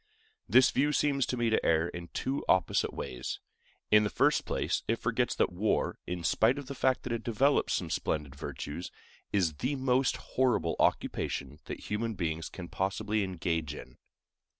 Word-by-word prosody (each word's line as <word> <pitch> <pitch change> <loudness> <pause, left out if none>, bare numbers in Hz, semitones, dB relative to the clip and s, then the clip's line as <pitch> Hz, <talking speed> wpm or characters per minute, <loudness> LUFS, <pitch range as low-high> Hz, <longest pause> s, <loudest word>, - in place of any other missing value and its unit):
This 125 +6 +6
view 145 +3 +2
seems 140 -3 +2
to 125 - -2
me 120 -1 +1
to 110 - +2
err 80 +1 +3
in 85 0 -7
two 135 +9 -2
opposite 95 -1 +3
ways. 60 - -5 0.5
In 105 0 +7
the 105 - 0
first - - +2
place, - - -1
it - - +2
forgets - - 0
that - - +2
war, 105 +5 0
in 90 -1 -3
spite 110 +9 +3
of 145 - -5
the 140 - -6
fact 130 -1 +1
that 120 - -3
it 115 - -3
develops 135 +5 +2
some 85 -3 -3
splendid 75 -3 -2
virtues, 70 +3 -6 0.4
is 90 -6 +2
the 135 +4 -1
most 130 -1 +2
horrible 125 -10 +1
occupation 70 +2 0
that - - -6
human 110 +1 -2
beings 80 -2 -2
can 90 -2 -8
possibly 100 +3 -1
engage 80 -5 -2
in. - - -11
105 Hz, 175 wpm, -30 LUFS, 85-125 Hz, 0.5 s, In